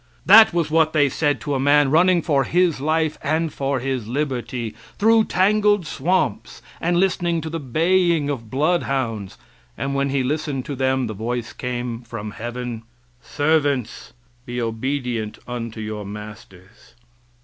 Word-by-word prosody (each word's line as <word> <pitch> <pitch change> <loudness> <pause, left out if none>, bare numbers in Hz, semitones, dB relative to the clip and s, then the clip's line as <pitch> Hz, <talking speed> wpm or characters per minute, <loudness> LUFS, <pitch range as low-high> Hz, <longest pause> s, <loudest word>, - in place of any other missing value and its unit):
That 220 +4 +8
was 170 -3 -1
what 160 -1 +3
they 145 -3 +3
said 145 0 0
to 145 - -3
a 135 - 0
man 145 0 +4
running 175 +2 +4
for 140 -5 +2
his 175 -1 +1
life 155 +1 0
and 160 +1 -1
for 135 -1 -1
his 130 -3 -3
liberty 125 -4 -3 0.2
through 225 +1 +4
tangled 205 0 +2
swamps 145 - -1 0.2
and 175 +1 +1
listening 175 -2 +1
to 160 0 -6
the 165 - -3
baying 165 +3 +2
of 120 -6 -4
bloodhounds, 135 - -1 0.4
and 140 - -2
when 140 0 0
he 135 -1 0
listened 140 -1 -2
for 145 - -4
them 130 -1 0
the 110 - -4
voice 120 +3 -4
came 120 -1 -4
from 110 -3 -7
heaven: 120 +1 -5 0.4
"Servants, 145 -3 -1 0.3
be 120 0 -5
obedient 115 -1 -3
unto 115 -2 -5
your 105 -1 -5
masters." 105 +1 -11
135 Hz, 150 wpm, -22 LUFS, 120-160 Hz, 0.4 s, That